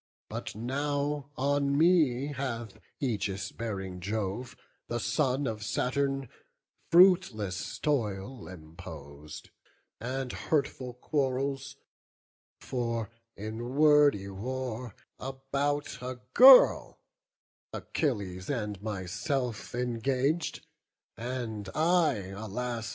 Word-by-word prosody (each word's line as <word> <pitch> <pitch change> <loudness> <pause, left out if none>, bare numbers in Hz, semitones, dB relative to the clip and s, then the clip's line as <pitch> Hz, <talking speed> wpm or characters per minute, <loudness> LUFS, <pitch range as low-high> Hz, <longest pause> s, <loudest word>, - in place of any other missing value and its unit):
But - - -5
now 145 +4 -2
on 140 +1 +1
me 150 -5 +3
hath 120 -6 -4 0.2
aegis 100 -6 -2
bearing 95 -5 -5
Jove, 105 +5 -3 0.3
The 120 - -2
son 135 +1 +1
of 110 -3 -3
Saturn, 135 +3 0 0.6
fruitless 165 - +4
toil 115 - -2
impos'd, 75 -3 -10 0.5
And 130 +1 -3
hurtful 135 -4 -1
quarrels; 135 +1 -1 0.8
for 115 -4 -2 0.3
in 110 +5 -5
wordy 145 -9 +5
war 125 +2 -5 0.2
About 135 +1 -2
a 125 0 -5
girl, 260 0 +8 0.7
Achilles 100 - -2
and 105 -7 -2
myself 110 +5 -3
Engag'd; 130 +6 -1 0.5
and 115 -4 -4
I, 155 - +2
alas! 115 +2 -4
125 Hz, 85 wpm, -30 LUFS, 105-140 Hz, 0.8 s, girl